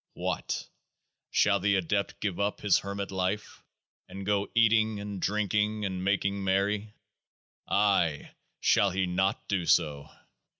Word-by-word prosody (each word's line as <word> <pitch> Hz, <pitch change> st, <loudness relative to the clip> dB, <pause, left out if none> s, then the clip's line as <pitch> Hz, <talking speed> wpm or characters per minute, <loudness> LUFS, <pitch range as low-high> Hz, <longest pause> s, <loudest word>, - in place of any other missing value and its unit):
What! -, -, -3 dB, 0.6 s
shall 100 Hz, -1 st, +3 dB
the 100 Hz, +1 st, +2 dB
Adept 100 Hz, +2 st, -1 dB
give 100 Hz, -4 st, -2 dB
up 100 Hz, +1 st, -1 dB
his 100 Hz, -3 st, +4 dB
hermit 100 Hz, 0 st, -5 dB
life, 95 Hz, +2 st, -3 dB, 0.5 s
and 95 Hz, 0 st, -7 dB
go 100 Hz, 0 st, 0 dB
eating 110 Hz, -2 st, +3 dB
and 100 Hz, -2 st, -6 dB
drinking 105 Hz, +1 st, 0 dB
and 95 Hz, -1 st, -3 dB
making 100 Hz, 0 st, 0 dB
merry? 100 Hz, +2 st, 0 dB, 0.7 s
Ay! 95 Hz, -7 st, +1 dB, 0.3 s
shall 100 Hz, -, +3 dB
he 95 Hz, +1 st, 0 dB
not 95 Hz, +3 st, -1 dB
do 90 Hz, -4 st, -1 dB
so? 70 Hz, -1 st, +2 dB
100 Hz, 130 wpm, -29 LUFS, 95-105 Hz, 0.7 s, his